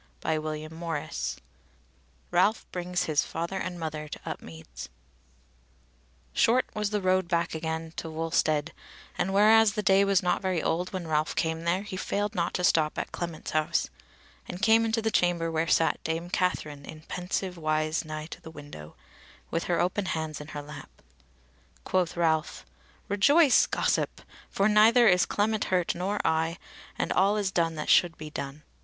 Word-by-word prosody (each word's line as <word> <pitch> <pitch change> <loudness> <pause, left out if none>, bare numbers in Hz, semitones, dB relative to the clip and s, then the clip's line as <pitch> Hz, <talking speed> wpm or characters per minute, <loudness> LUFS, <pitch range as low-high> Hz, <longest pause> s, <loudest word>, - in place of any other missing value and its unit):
CHAPTER 155 -1 -2
30 160 -2 -4 0.9
Ralph 215 +2 +2
Brings 180 0 -2
His 155 -2 +1
Father 170 +3 -4
and 180 -2 -4
Mother 155 -2 -4
to - - -8
Upmeads 80 -8 -8 1.4
Short 250 +3 +3
was 210 -1 -1
the 210 -2 -2
road 185 -1 +2
back 170 -1 0
again 160 0 -4
to 165 - -4
Wulstead, 160 -1 0 0.4
and 190 - -1
whereas 215 +1 +5
the 210 - -2
day 195 -1 +5
was 195 -2 +2
not 180 - +1
very 185 -3 0
old 175 +3 -1
when 185 -4 -5
Ralph 155 0 0
came 160 0 -1
there, 180 +3 +1
he 200 -3 -6
failed 205 +3 -2
not 170 -4 -1
to 180 - -1
stop 160 -5 +2
at - - -3
Clement's 170 -2 -5
house, 155 - 0 0.6
and 180 - -6
came 225 0 +5
into 225 0 0
the 220 - +1
chamber 170 -3 +1
where 160 +1 0
sat 165 - +2
Dame 165 +2 -3
Katherine 150 -6 -1
in 155 +2 -10
pensive 180 +2 -3
wise 155 -1 0
nigh 155 -1 -6
to 160 - -10
the - - -10
window, 145 - -11 0.6
with 165 - -1
her 175 -1 0
open 185 +3 0
hands 160 -4 -3
in 150 - -9
her 145 0 -6
lap. 145 -1 -10 0.9
Quoth 180 -2 0
Ralph: 160 -2 0 0.4
"Rejoice, 280 +8 +5
gossip! - - -1 0.3
for 195 - +1
neither 220 +3 +6
is 180 -2 +4
Clement 215 +1 0
hurt, 180 -2 +1
nor 195 +4 -2
I, 160 +1 +1 0.4
and - - -1
all 200 +3 +3
is 200 -2 0
done 165 -3 0
that 150 - -5
should 175 -2 +4
be 155 -1 -8
done." 140 +1 -6
170 Hz, 165 wpm, -28 LUFS, 155-195 Hz, 1.4 s, neither